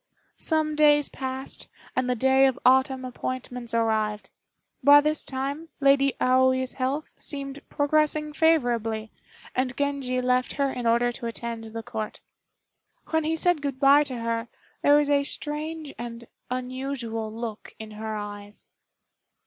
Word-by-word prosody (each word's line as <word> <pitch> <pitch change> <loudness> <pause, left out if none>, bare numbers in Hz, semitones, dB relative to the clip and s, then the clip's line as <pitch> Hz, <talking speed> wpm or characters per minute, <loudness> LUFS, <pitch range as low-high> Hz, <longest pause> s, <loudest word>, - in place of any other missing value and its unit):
Some 310 -1 +1
days 295 -1 +4
passed, 265 0 -6 0.3
and 255 0 0
the 250 - +2
day 265 +3 +4
of 265 -1 -1
autumn 260 0 +4
appointments 250 -1 -5
arrived. 220 -2 0 0.5
By 285 +2 +9
this 305 +1 0
time, 280 +5 -4
Lady 275 -1 +4
Aoi's 260 0 +3
health 275 +4 -2
seemed 275 -1 -4
progressing 300 +1 +1
favorably, 240 -9 +1 0.4
and 255 -1 -1
Genji 280 -3 -1
left 250 0 +1
her 275 -1 0
in 245 -2 -2
order 240 +1 +3
to 235 0 -6
attend 230 0 -5
the 225 +1 -7
Court. 220 -2 -5 0.9
When 320 -1 +1
he 320 +1 +1
said 345 -1 +2
good 275 -2 -3
by 280 +1 +6
to 260 - -4
her, 230 0 -2 0.3
there 290 0 +6
was 295 -1 +2
a 280 0 +4
strange 300 +1 -4
and 235 0 -7 0.2
unusual 250 -3 -4
look 225 -1 -7
in 220 -1 -9
her 215 +1 -5
eyes. 205 0 -7
260 Hz, 140 wpm, -26 LUFS, 235-285 Hz, 0.9 s, By